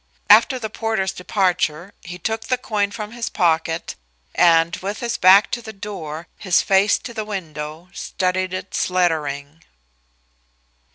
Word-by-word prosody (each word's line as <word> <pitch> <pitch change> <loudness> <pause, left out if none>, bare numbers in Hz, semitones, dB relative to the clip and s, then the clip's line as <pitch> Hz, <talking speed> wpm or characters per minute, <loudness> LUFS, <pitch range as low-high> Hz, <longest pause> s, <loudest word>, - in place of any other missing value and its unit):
After 265 - +6
the 220 -4 -5
porter's 220 -4 -1
departure 180 -2 -1
he 175 +1 -8
took 220 +3 -3
the 255 - +1
coin 210 -4 -1
from 210 -1 -7
his 235 0 -4
pocket, 165 -2 0 0.4
and, 165 0 +4
with 200 +2 -5
his 235 -1 -2
back 190 +3 +6
to 240 - -2
the 220 -1 -9
door, 175 -6 -7
his 185 -2 +2
face 195 +1 +3
to 235 - -9
the 220 -2 -3
window, 160 -5 -6
studied 185 -1 -2
its 185 0 -3
lettering. 155 -4 -1
185 Hz, 140 wpm, -21 LUFS, 165-215 Hz, 0.4 s, After